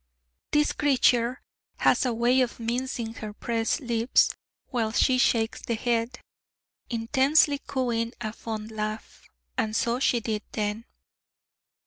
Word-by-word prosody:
This 295 Hz, 0 st, +3 dB
creature 255 Hz, -3 st, +2 dB, 0.3 s
has -, -, +3 dB
a -, -, +1 dB
way 245 Hz, +3 st, +3 dB
of 245 Hz, -1 st, -1 dB
mincing 235 Hz, 0 st, -3 dB
her 215 Hz, -2 st, -7 dB
pressed 230 Hz, +6 st, -1 dB
lips, 235 Hz, -1 st, +2 dB, 0.4 s
while 230 Hz, -4 st, -1 dB
she 255 Hz, +3 st, +3 dB
shakes 225 Hz, -2 st, +2 dB
the 235 Hz, -, -2 dB
head, 235 Hz, +2 st, -1 dB, 0.7 s
intensely 270 Hz, +5 st, +3 dB
cooing 235 Hz, -3 st, -1 dB
a 215 Hz, -2 st, -4 dB
fond 220 Hz, -1 st, -6 dB
laugh: 215 Hz, 0 st, -6 dB, 0.3 s
and 215 Hz, 0 st, -1 dB
so 235 Hz, +2 st, +1 dB
she 250 Hz, -2 st, +2 dB
did 220 Hz, -2 st, -2 dB
then. 210 Hz, +2 st, -2 dB
235 Hz, 125 wpm, -26 LUFS, 225-255 Hz, 0.7 s, This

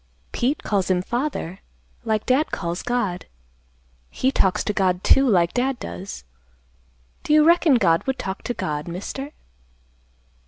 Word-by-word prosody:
"Pete 265 Hz, +5 st, -1 dB
calls 195 Hz, -3 st, 0 dB
him 180 Hz, -1 st, +1 dB
father, 240 Hz, -, -3 dB, 0.4 s
like 220 Hz, -2 st, -1 dB
Dad 270 Hz, +5 st, +2 dB
calls 170 Hz, 0 st, -3 dB
God. 205 Hz, -8 st, -2 dB, 0.8 s
He 260 Hz, -, 0 dB
talks 190 Hz, -8 st, +1 dB
to 210 Hz, -, -1 dB
God, 185 Hz, -2 st, +1 dB
too, 270 Hz, -1 st, +5 dB
like 175 Hz, -5 st, +3 dB
Dad 255 Hz, +1 st, 0 dB
does. 190 Hz, -, -7 dB, 1.0 s
Do 300 Hz, -, 0 dB
you 305 Hz, 0 st, +6 dB
reckon 335 Hz, -3 st, +5 dB
God 170 Hz, -6 st, +2 dB
would 265 Hz, 0 st, 0 dB
talk 190 Hz, -5 st, -5 dB
to 245 Hz, -, -2 dB
God, 150 Hz, +1 st, -3 dB
mister?" 205 Hz, -, -6 dB
215 Hz, 145 wpm, -23 LUFS, 180-265 Hz, 1.0 s, you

